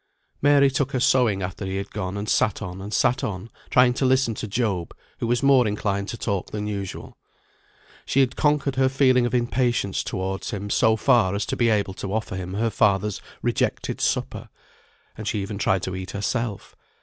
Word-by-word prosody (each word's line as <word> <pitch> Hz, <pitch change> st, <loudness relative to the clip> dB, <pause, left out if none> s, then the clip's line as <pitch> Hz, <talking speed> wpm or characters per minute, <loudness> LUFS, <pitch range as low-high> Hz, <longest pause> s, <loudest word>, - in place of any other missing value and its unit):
Mary 140 Hz, -1 st, +5 dB
took 135 Hz, +1 st, -1 dB
her 130 Hz, -, +1 dB
sewing 120 Hz, -6 st, +3 dB
after 90 Hz, +2 st, -5 dB
he 95 Hz, 0 st, -3 dB
had 100 Hz, +1 st, -5 dB
gone, 100 Hz, -1 st, -4 dB
and 100 Hz, +1 st, -4 dB
sat 105 Hz, -, +1 dB
on, 90 Hz, -2 st, -6 dB
and 100 Hz, +2 st, -7 dB
sat 125 Hz, -, +2 dB
on, 100 Hz, +2 st, -4 dB, 0.2 s
trying 125 Hz, 0 st, +5 dB
to 130 Hz, -, -2 dB
listen 130 Hz, -2 st, +3 dB
to 110 Hz, -, -5 dB
Job, 100 Hz, -5 st, -2 dB, 0.2 s
who -, -, -2 dB
was 120 Hz, +3 st, +1 dB
more 135 Hz, -4 st, +5 dB
inclined 100 Hz, -1 st, -1 dB
to 120 Hz, -, -5 dB
talk 100 Hz, -6 st, -2 dB
than 105 Hz, -1 st, -4 dB
usual. 100 Hz, -2 st, -5 dB, 0.9 s
She 140 Hz, -, +1 dB
had 130 Hz, -1 st, +1 dB
conquered 145 Hz, -3 st, +1 dB
her 130 Hz, 0 st, +4 dB
feeling 130 Hz, -2 st, +3 dB
of 120 Hz, -, -2 dB
impatience 120 Hz, -4 st, 0 dB
towards 95 Hz, 0 st, -3 dB
him 105 Hz, -2 st, -4 dB
so 110 Hz, 0 st, +4 dB
far 110 Hz, -5 st, +3 dB
as 100 Hz, -, -1 dB
to -, -, -2 dB
be 120 Hz, -1 st, +2 dB
able 100 Hz, -3 st, +1 dB
to 95 Hz, 0 st, -6 dB
offer 110 Hz, -4 st, -3 dB
him 95 Hz, 0 st, -5 dB
her 115 Hz, +2 st, 0 dB
father's 100 Hz, 0 st, +1 dB, 0.2 s
rejected -, -, -1 dB
supper; -, -, -1 dB, 0.7 s
and 110 Hz, -, -7 dB
she 105 Hz, -, 0 dB
even 100 Hz, 0 st, -5 dB
tried 95 Hz, -2 st, +1 dB
to 95 Hz, -, -3 dB
eat 95 Hz, 0 st, -6 dB
herself. 105 Hz, +1 st, -3 dB
105 Hz, 195 wpm, -24 LUFS, 100-125 Hz, 0.9 s, Mary